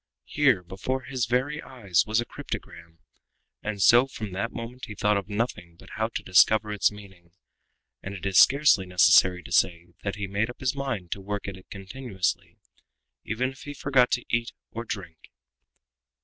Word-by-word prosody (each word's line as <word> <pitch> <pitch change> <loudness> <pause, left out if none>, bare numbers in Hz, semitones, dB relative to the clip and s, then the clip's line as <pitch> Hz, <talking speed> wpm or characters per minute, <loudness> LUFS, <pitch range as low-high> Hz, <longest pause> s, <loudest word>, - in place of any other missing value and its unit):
Here, 130 -11 +2
before 95 +9 -3
his 125 -2 -2
very 135 +6 0
eyes, 100 -10 0
was 110 +1 +2
a 120 - -1
cryptogram! 85 -7 -8 0.6
And 105 -2 -2
so 120 +3 +6
from 110 -6 -7
that 100 +6 -3
moment 120 +2 -7
he 105 - -9
thought 105 +1 +2
of 100 +1 -3
nothing 100 -6 -3
but - - -16
how 110 0 -1
to 115 - -5
discover 105 +3 +4
its 105 - +2
meaning, 95 -5 -15 0.7
and 100 +1 -6
it 95 - -8
is 95 -1 +4
scarcely 140 -9 +5
necessary 90 0 +5
to - - -12
say 85 0 +1
that 100 -1 -3
he 105 -1 -4
made 100 +4 -1
up 120 - -10
his 130 0 -1
mind 125 -11 -4
to 100 - -3
work 100 +1 -4
at 100 - -5
it 95 - -16
continuously, 95 -2 -4 0.7
even 125 +4 -1
if 135 - -16
he 145 0 -8
forgot 130 -3 +3
to 125 - -1
eat 115 0 0 0.2
or 115 +1 -6
to - - -33
drink. 90 -7 -7
105 Hz, 185 wpm, -26 LUFS, 95-125 Hz, 0.7 s, so